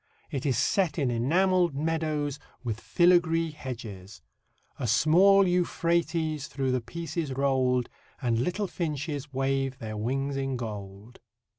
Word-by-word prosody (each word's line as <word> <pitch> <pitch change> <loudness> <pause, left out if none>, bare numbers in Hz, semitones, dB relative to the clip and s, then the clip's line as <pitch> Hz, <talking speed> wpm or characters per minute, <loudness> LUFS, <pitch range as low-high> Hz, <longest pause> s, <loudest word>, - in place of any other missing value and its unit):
It 140 0 -2
is 130 - +1
set 180 -7 +1
in 135 -6 +1
enamelled 175 +7 +2
meadows, 150 -2 -1 0.2
with 110 -2 -3
filigree 170 -2 +3
hedges: 115 -9 -8 0.6
"A 125 - -1
small 185 - +5
Euphrates 170 -3 0
through 135 -3 -2
the 130 -1 0
piece 165 +8 -7
is 155 -5 -1
roll'd, 130 -2 +1 0.3
And 120 -4 0
little 180 - -1
finches 150 -5 -4
wave 135 0 -1
their 110 -4 -6
wings 135 +6 -2
in 135 -1 -2
gold." 105 0 -7
140 Hz, 130 wpm, -28 LUFS, 125-165 Hz, 0.6 s, small